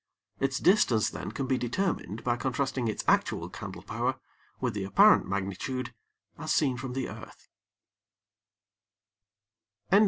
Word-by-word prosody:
Its 135 Hz, -2 st, 0 dB
distance 155 Hz, -, +4 dB
then -, -, -5 dB
can 135 Hz, -, -3 dB
be 130 Hz, -1 st, +1 dB
determined 120 Hz, -, -2 dB
by 120 Hz, -1 st, +1 dB
contrasting 130 Hz, 0 st, -1 dB
its 110 Hz, -, -2 dB
actual -, -, +2 dB
candle -, -, -8 dB
power -, -, -2 dB, 0.4 s
with 125 Hz, -3 st, -1 dB
the 100 Hz, -1 st, -3 dB
apparent 95 Hz, -, +6 dB
magnitude 100 Hz, +6 st, -3 dB, 0.5 s
as 155 Hz, 0 st, -3 dB
seen 135 Hz, -5 st, +3 dB
from 125 Hz, +1 st, -5 dB
the 130 Hz, 0 st, -2 dB
earth. -, -, -11 dB
125 Hz, 125 wpm, -29 LUFS, 110-135 Hz, 0.5 s, apparent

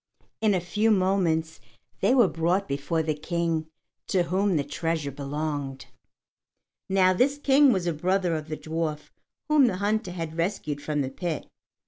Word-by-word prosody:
In 215 Hz, -3 st, +3 dB
a -, -, +2 dB
few 210 Hz, +6 st, 0 dB
moments 185 Hz, -5 st, +1 dB, 0.4 s
they 260 Hz, -, +3 dB
were 240 Hz, -6 st, +6 dB
brought 175 Hz, +4 st, 0 dB
before 145 Hz, +4 st, -1 dB
the 155 Hz, -1 st, 0 dB
King 165 Hz, +1 st, -2 dB, 0.4 s
to 185 Hz, -2 st, +2 dB
whom 190 Hz, +2 st, +1 dB
the 145 Hz, -, +1 dB
treasure 155 Hz, 0 st, -2 dB
belonged. 145 Hz, -1 st, -4 dB, 1.0 s
Now 185 Hz, -1 st, +4 dB
this 270 Hz, +9 st, +2 dB
King 280 Hz, -1 st, +5 dB
was 190 Hz, -6 st, 0 dB
a 170 Hz, -, 0 dB
brother 180 Hz, +2 st, 0 dB
of 155 Hz, -1 st, -5 dB
the 155 Hz, -1 st, -4 dB
dwarf 155 Hz, -1 st, -4 dB, 0.4 s
whom 300 Hz, -4 st, +5 dB
the 185 Hz, -, -1 dB
hunter 205 Hz, -1 st, -1 dB
had 165 Hz, -3 st, -5 dB
rescued 160 Hz, -5 st, -2 dB
from 150 Hz, -1 st, -1 dB
the 135 Hz, -1 st, -3 dB
pit. 165 Hz, +2 st, -4 dB
170 Hz, 160 wpm, -26 LUFS, 155-195 Hz, 1.0 s, were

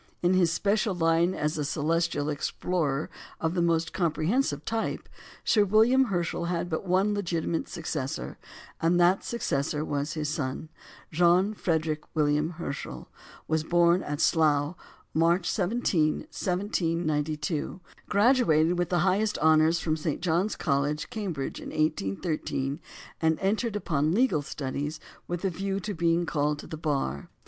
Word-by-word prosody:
In 175 Hz, +1 st, +4 dB
his 180 Hz, -3 st, +3 dB
special 205 Hz, +2 st, +1 dB
line 165 Hz, +1 st, +2 dB
as 150 Hz, +1 st, -1 dB
a -, -, 0 dB
celestial 155 Hz, 0 st, 0 dB
explorer 150 Hz, 0 st, -1 dB, 0.3 s
of 160 Hz, +1 st, -1 dB
the 180 Hz, -, +1 dB
most 165 Hz, -1 st, +1 dB
comprehensive 165 Hz, -, 0 dB
type, 225 Hz, 0 st, -2 dB, 0.4 s
Sir 210 Hz, -3 st, +4 dB
William 225 Hz, +6 st, +4 dB
Herschel 175 Hz, -5 st, -2 dB
had 175 Hz, 0 st, -2 dB
but 160 Hz, +4 st, -3 dB
one 190 Hz, +3 st, +2 dB
legitimate 170 Hz, -4 st, -2 dB
successor, 150 Hz, -5 st, -4 dB, 0.4 s
and 170 Hz, +2 st, +3 dB
that 175 Hz, +3 st, +4 dB
successor 150 Hz, -9 st, -1 dB
was 145 Hz, +1 st, -2 dB
his 155 Hz, -2 st, -2 dB
son. 145 Hz, +1 st, -3 dB, 0.4 s
John 180 Hz, +5 st, +3 dB
Frederick 160 Hz, -5 st, -1 dB
William 150 Hz, 0 st, +2 dB
Herschel 170 Hz, -5 st, -6 dB, 0.4 s
was 160 Hz, -1 st, +1 dB
born 175 Hz, +2 st, +3 dB
at 145 Hz, 0 st, -4 dB
Slough, 155 Hz, -1 st, +2 dB, 0.4 s
March 170 Hz, +2 st, +2 dB
17, 180 Hz, -6 st, +1 dB
1792, 165 Hz, -5 st, -1 dB, 0.3 s
graduated 200 Hz, -, +3 dB
with 175 Hz, -, 0 dB
the 175 Hz, -, +2 dB
highest 205 Hz, +3 st, +1 dB
honours 160 Hz, +1 st, +4 dB
from 155 Hz, -2 st, 0 dB
St. 155 Hz, -1 st, -2 dB
John's 175 Hz, +4 st, 0 dB
College, 145 Hz, -, -1 dB
Cambridge, 190 Hz, -, -4 dB
in -, -, -7 dB
1813, 145 Hz, -, -1 dB, 0.4 s
and 160 Hz, -1 st, +2 dB
entered 210 Hz, +3 st, 0 dB
upon 155 Hz, -4 st, 0 dB
legal 220 Hz, -, +3 dB
studies 145 Hz, +2 st, -4 dB, 0.3 s
with 175 Hz, +2 st, -3 dB
a 190 Hz, -, +1 dB
view 195 Hz, +3 st, -2 dB
to 205 Hz, +3 st, -4 dB
being 170 Hz, 0 st, +1 dB
called 150 Hz, -2 st, 0 dB
to -, -, -9 dB
the -, -, -6 dB
Bar. 140 Hz, -, -2 dB
165 Hz, 140 wpm, -27 LUFS, 150-185 Hz, 0.4 s, In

